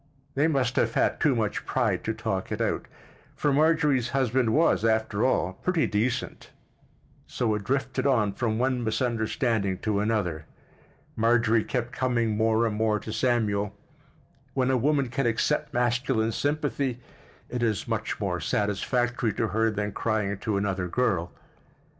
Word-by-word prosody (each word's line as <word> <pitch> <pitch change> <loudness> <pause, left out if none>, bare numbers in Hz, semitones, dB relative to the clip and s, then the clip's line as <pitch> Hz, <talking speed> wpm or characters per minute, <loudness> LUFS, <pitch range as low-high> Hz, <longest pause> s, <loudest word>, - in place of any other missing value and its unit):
They 145 +3 +2
must 130 -5 0
have - - +1
had - - +1
too 145 -4 +3
much 110 -3 -1
pride - - 0
to - - 0
talk - - -3
it - - -2
out—for 145 - -3
Marjorie's 150 -4 +3
husband 130 -2 +1
was, 160 -3 +3
after 110 -1 +1
all, 95 -8 +1
pretty 170 - 0
decent—so 110 +1 -4
it 105 -1 -3
drifted 135 +4 -1
on 110 -7 +2
from 110 0 -1
one 125 0 0
misunderstanding 110 -3 0
to 105 -2 +1
another. 100 -8 -1 0.7
Marjorie 115 -1 +3
kept 120 -2 -3
coming 120 -4 0
more 110 +1 +2
and 110 -2 -1
more 110 -1 +2
to 110 - -7
Samuel; 105 -5 0 0.8
when 130 -1 +2
a - - +3
woman 140 +1 +2
can 135 0 0
accept 120 +6 0
masculine 120 -1 +1
sympathy 145 -3 -1 0.5
at 125 - -1
is 110 -1 0
much 115 -1 -2
more 95 -4 -1
satisfactory 110 +5 0
to 115 - -1
her 110 +3 +2
than 105 -1 -2
crying 105 -2 -1
to 105 -3 -1
another 95 -2 -1
girl. 90 -5 0
115 Hz, 145 wpm, -26 LUFS, 105-130 Hz, 0.8 s, too